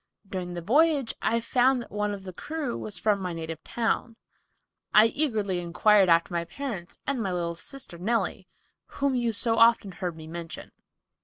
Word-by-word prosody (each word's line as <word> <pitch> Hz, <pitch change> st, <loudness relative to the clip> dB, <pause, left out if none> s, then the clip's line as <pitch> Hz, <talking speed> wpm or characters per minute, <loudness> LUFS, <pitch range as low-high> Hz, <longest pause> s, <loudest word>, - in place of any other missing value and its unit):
During 180 Hz, -2 st, -5 dB
the 175 Hz, -, -5 dB
voyage, 285 Hz, -, +3 dB
I 230 Hz, +1 st, +2 dB
found 250 Hz, +3 st, +3 dB
that -, -, -16 dB
one 210 Hz, 0 st, -1 dB
of 200 Hz, -1 st, -6 dB
the 185 Hz, -1 st, -8 dB
crew 295 Hz, -, -4 dB
was 210 Hz, -, -5 dB
from 210 Hz, -2 st, +1 dB
my 180 Hz, -2 st, -3 dB
native 165 Hz, -1 st, -6 dB
town. 230 Hz, 0 st, -1 dB, 0.8 s
I 215 Hz, -, +9 dB
eagerly 220 Hz, -8 st, +1 dB
inquired 185 Hz, +3 st, +4 dB
after 170 Hz, +1 st, +3 dB
my 170 Hz, -1 st, 0 dB
parents 215 Hz, -6 st, -6 dB
and 270 Hz, -3 st, -1 dB
my 195 Hz, -3 st, -1 dB
little 170 Hz, -1 st, -1 dB
sister 175 Hz, 0 st, -7 dB
Nellie, 225 Hz, +6 st, -1 dB, 0.5 s
whom 280 Hz, -1 st, +1 dB
you 240 Hz, -2 st, +1 dB
so 225 Hz, +1 st, 0 dB
often 230 Hz, -3 st, +5 dB
heard 180 Hz, -3 st, -4 dB
me 160 Hz, -, -9 dB
mention. 165 Hz, -1 st, -7 dB
210 Hz, 175 wpm, -27 LUFS, 175-240 Hz, 0.8 s, I